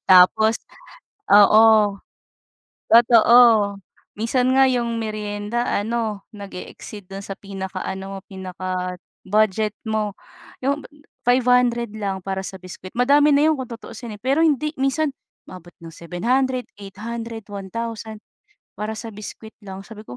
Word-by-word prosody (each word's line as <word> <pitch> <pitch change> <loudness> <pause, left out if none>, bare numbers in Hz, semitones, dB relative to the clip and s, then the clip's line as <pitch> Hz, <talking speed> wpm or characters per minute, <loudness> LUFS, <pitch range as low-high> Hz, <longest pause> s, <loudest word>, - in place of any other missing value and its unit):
Tapos 200 +5 +6 0.8
oo. 210 +2 +8 1.2
Totoo, 235 0 +6 0.8
minsan 250 +3 +1
nga 270 - +7
'yong 235 -2 -1
meryenda 215 +1 -3
ano, 215 -1 -2
nag-e-exceed 200 0 -9
do'n 195 +1 -7
sa 195 - -6
pinakaano, 195 0 -6
pinaka-budget 190 +3 -2 0.2
mo 215 -2 -1 0.5
'yong 280 +2 0 0.4
500 245 -2 +3
lang 195 -2 -3
para 190 0 -3
sa 190 - -7
biscuit, 185 0 -10
madami 285 +4 +5
na 295 +2 +4
'yon 315 - +3
kung 255 -2 -6
tutuusin, 230 -1 -8
eh, - - -23
pero 275 +5 +2
hindi 300 +1 +1
minsan, 275 +3 +1 0.4
umaabot 175 -1 -12
ng 165 -1 -10
700, 250 +10 -1
800, 225 +3 -7
1,000 220 +2 -6 0.6
para 215 +1 -3
sa 225 0 -7
biscuit 215 +1 -9
lang 195 -1 -8
sabi 215 -1 -11
ko, 125 - -9
215 Hz, 120 wpm, -22 LUFS, 195-240 Hz, 1.2 s, oo